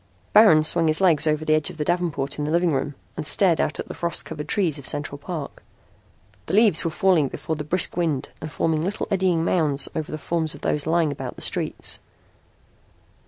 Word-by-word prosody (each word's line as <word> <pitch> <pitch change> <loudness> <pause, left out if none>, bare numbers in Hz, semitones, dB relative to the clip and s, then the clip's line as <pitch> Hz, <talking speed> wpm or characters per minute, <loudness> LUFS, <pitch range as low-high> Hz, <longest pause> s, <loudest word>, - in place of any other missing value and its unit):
Baron 205 -8 +7
swung 165 +1 +3
his 155 +1 +1
legs 165 -5 +3
over 155 0 0
the 155 - +2
edge 155 -1 +1
of - - -11
the 150 - -2
davenport 165 -6 -1
in 150 - -1
the - - -3
living 170 0 +1
room 140 +1 -2 0.2
and 155 - -4
stared 180 -3 +4
out - - -2
at - - -5
the - - -7
frost 170 0 -2
covered 150 -2 -7
trees 170 -8 0
of 140 - -10
Central 145 -1 -2
Park. 155 -2 -7 0.9
The - - -1
leaves 210 -7 +4
were 165 - 0
falling 175 -4 +2
before 160 - -5
the 150 - -5
brisk 170 +4 -1
wind 160 -6 -1
and 155 - -6
forming 160 0 0
little 195 +6 -3
eddying 185 -4 +1
mounds 150 -6 +1
over 155 -1 -4
the 155 - -4
forms 160 +1 -2
of - - -14
those 150 0 -1
lying 165 -2 +2
about 135 -3 -6
the - - -6
streets. - - 0
160 Hz, 210 wpm, -23 LUFS, 150-175 Hz, 0.9 s, Baron